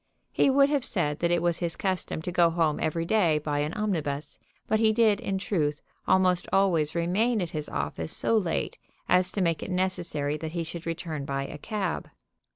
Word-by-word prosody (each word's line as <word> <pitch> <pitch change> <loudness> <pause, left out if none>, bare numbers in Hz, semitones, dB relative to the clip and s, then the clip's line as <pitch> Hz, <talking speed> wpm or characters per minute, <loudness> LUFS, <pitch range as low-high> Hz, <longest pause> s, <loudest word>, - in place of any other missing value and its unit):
He - - +3
would 275 +1 +5
have 285 -3 +1
said 150 -10 -1
that 170 - +1
it 175 -1 +1
was 170 -1 +1
his 170 -2 -1
custom 185 -4 -2
to 180 - -3
go 175 -1 +4
home 165 -2 +1
every 165 +1 -1
day 170 -5 +3
by 150 -1 -2
an 150 +1 -1
omnibus, 155 -9 -2 0.3
but 220 - +1
he 220 -1 +4
did, 220 -2 +3
in 195 - -2
truth, 155 -7 -1 0.3
almost 185 -1 +3
always 170 -6 +2
remain 205 +8 +1
at 175 -4 -3
his 150 -1 -4
office 80 +2 -3
so 230 - +1
late 185 -7 -1 0.3
as 180 0 +3
to 200 - -1
make 165 -3 +1
it - - -5
necessary 175 -6 -1
that 160 +1 -6
he 170 -1 -1
should 165 +1 -7
return 165 -3 -4
by 140 0 -2
a 150 - -8
cab. 200 -2 -3
170 Hz, 200 wpm, -27 LUFS, 155-195 Hz, 0.3 s, would